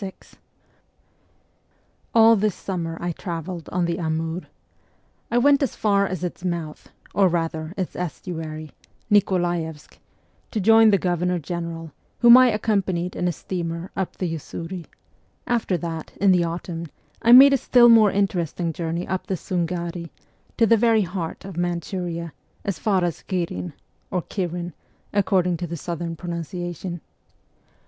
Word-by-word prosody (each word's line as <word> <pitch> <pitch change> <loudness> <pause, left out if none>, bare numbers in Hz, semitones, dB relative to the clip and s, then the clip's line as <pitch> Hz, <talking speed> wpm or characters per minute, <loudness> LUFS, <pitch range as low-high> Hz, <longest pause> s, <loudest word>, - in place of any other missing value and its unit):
VI 190 - -4 2.0
ALL 225 0 +7
this 210 -2 0
summer 165 -4 -4
I 175 0 -2
travelled 170 0 -6
on 180 -1 0
the 170 +2 -2
Amur. 160 +1 -2 0.8
I 235 - +1
went 280 +3 +5
as 275 - 0
far 200 -2 +2
as 185 -2 -4
its 180 0 -5
mouth, 170 -4 -4 0.2
or 195 -2 +4
rather 165 -1 -2
its 185 -2 -3
estuary 160 -3 -5 0.4
Nikolaevsk 175 -6 0 0.5
to 220 - -2
join 225 +2 +6
the 200 - +5
Governor 180 0 0
General, 165 0 -5 0.3
whom 240 0 +10
I 255 0 +8
accompanied 195 -5 0
in 180 - -1
a - - +2
steamer 170 +1 -5
up 190 -2 -3
the 185 - -2
Usuri; 165 +2 -7
and 180 -3 -6 0.6
after 225 -6 0
that, 165 -2 -6
in 200 -1 +5
the 180 -2 +3
autumn, 170 0 -5 0.3
I 235 - +4
made 270 +3 +10
a - - +5
still 245 -1 +5
more 225 -3 +7
interesting 175 -4 -1
journey 170 +2 -3
up 190 -1 -3
the 195 - -1
Sungari, 170 -1 -3 0.5
to 230 - +5
the 230 +1 +5
very 225 -1 +4
heart 175 -2 -5
of 195 -3 -8
Manchuria, 175 -1 -3 0.3
as 195 -5 -2
far 195 -4 +1
as 175 -2 -2
Ghirfn 170 - -3 0.4
(or 180 -2 -1
Kirin, 175 -3 -4 0.4
according 185 -3 +2
to 175 +1 -4
the 170 +1 -5
southern 170 +1 -4
pronunciation). 175 +1 -5
175 Hz, 145 wpm, -23 LUFS, 170-195 Hz, 2.0 s, whom